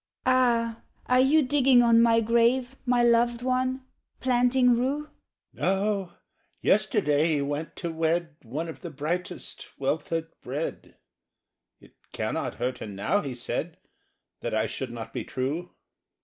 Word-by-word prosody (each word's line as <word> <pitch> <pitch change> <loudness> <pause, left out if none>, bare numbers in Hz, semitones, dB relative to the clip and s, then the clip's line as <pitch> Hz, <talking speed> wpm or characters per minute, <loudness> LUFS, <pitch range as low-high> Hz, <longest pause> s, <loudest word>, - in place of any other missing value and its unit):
"AH, 235 -3 +2 0.2
are 250 0 +3
you 290 +4 +5
digging 260 -2 +4
on 230 -1 +5
my 230 -1 +4
grave 235 +3 +2
My 245 -1 +3
loved 235 0 +3
one?—planting 255 -1 +1
rue?" 275 +5 -1 0.4
—"No: 195 -1 0 0.5
yesterday 150 +2 +2
he 145 - 0
went 145 +3 -4
to 170 - -4
wed 165 0 -1
One 145 +8 -4
of 160 - -9
the 175 - -6
brightest 170 +5 -5
wealth 145 +3 -1
has 165 -1 0 0.2
bred. 145 +6 -5 0.8
'It - - -20 0.2
cannot - - -2
hurt 125 0 -3
her - - -6
now,' 105 - 0
he 135 -4 -5
said, 120 - -4 0.6
'That - - -3
I 110 0 +2
should 125 +3 -4
not 115 -1 -8
be - - -3
true. 145 +8 -3
205 Hz, 135 wpm, -27 LUFS, 150-250 Hz, 0.8 s, you